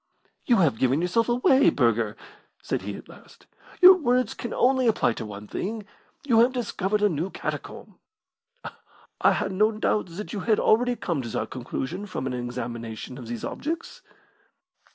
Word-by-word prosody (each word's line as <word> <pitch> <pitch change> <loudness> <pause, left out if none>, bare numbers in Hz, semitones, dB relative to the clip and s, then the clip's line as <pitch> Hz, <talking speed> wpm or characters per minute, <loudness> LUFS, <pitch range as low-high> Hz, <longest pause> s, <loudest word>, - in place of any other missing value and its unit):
"You 245 - +5
have 160 - +2
given 130 +3 +2
yourself 230 +7 +1
away, 260 +3 +4
Burger!" 115 -4 +1 0.5
said - - -2
he - - -5
at - - -11
last. - - -17 0.4
"Your 370 +1 +12
words 255 -8 +1
can 235 - -6
only 260 0 +2
apply 210 - +2
to 110 - -6
one 105 0 -9
thing. 215 - -4 0.4
You 235 -5 +4
have 245 +3 +4
discovered 210 -4 -1
a - - +6
new 170 0 -2
catacomb." - - -7 1.2
"I - - +5
had - - -2
no 210 +4 +3
doubt 215 -1 0
that 180 +5 -8
you 210 - -3
had 215 +2 +1
already 245 +3 +3
come 170 - -2
to 120 - -6
that - - -3
conclusion 135 +9 -5
from 185 - -5
an 130 - -2
examination 120 -1 -6
of 120 - -9
these 120 -1 -6
objects." 330 - -5
195 Hz, 170 wpm, -25 LUFS, -, 1.2 s, Your